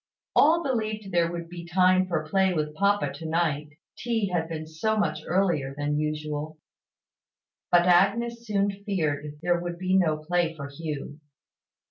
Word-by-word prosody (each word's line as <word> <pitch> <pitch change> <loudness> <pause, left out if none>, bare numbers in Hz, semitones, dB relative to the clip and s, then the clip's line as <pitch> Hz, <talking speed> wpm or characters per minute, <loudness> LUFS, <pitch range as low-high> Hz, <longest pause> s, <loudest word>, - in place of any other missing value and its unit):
All 330 +3 +5
believed 215 -6 -2
there 170 -1 +2
would 170 -1 -5
be 170 0 -8
time 185 +2 +3
for 160 -4 -2
play 190 +2 +2
with 150 -1 -1
papa 200 +5 +1
to 165 - -9
night, 155 -3 0 0.3
tea 225 -4 -1
had 165 -2 -1
been 155 -1 -4
so 160 +8 -1
much 155 -7 0
earlier 170 -7 +1
than 145 0 -1
usual. 150 0 -3 1.1
But 175 0 +5
Agnes 230 +6 +2
soon 200 -1 +1
feared 150 -7 -2
there 175 0 +2
would 175 0 -5
be 185 +1 0
no 165 -5 +3
play 165 +1 0
for 140 -2 -7
Hugh. 145 0 -6
175 Hz, 155 wpm, -26 LUFS, 155-195 Hz, 1.1 s, All